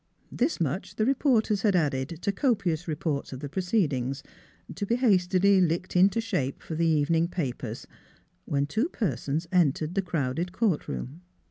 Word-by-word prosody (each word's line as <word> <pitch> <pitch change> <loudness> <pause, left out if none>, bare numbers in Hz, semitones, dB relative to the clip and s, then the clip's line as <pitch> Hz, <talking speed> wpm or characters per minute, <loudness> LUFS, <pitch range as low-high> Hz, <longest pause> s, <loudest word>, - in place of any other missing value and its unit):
This 265 +7 0
much 180 +5 -2
the 215 - +1
reporters 240 -6 +2
had 205 -3 +2
added 140 -6 +1 0.2
to 200 - +1
copious 190 - 0
reports 150 -2 -2
of 130 - -6
the 145 - -5
proceedings, 145 - -1 0.5
to 180 - -5
be 235 - +2
hastily 195 -4 +3
licked 175 +2 0
into 195 +5 +4
shape 140 - -2
for - - -6
the 165 +1 +1
evening 160 +2 +2
papers, 130 -9 -4 0.6
when 140 0 0
two 220 - -1
persons 155 - -2
entered 160 -2 +2
the 195 - +1
crowded 170 0 -2
court 195 -6 0
room. 145 +8 -6
175 Hz, 155 wpm, -27 LUFS, 145-200 Hz, 0.6 s, into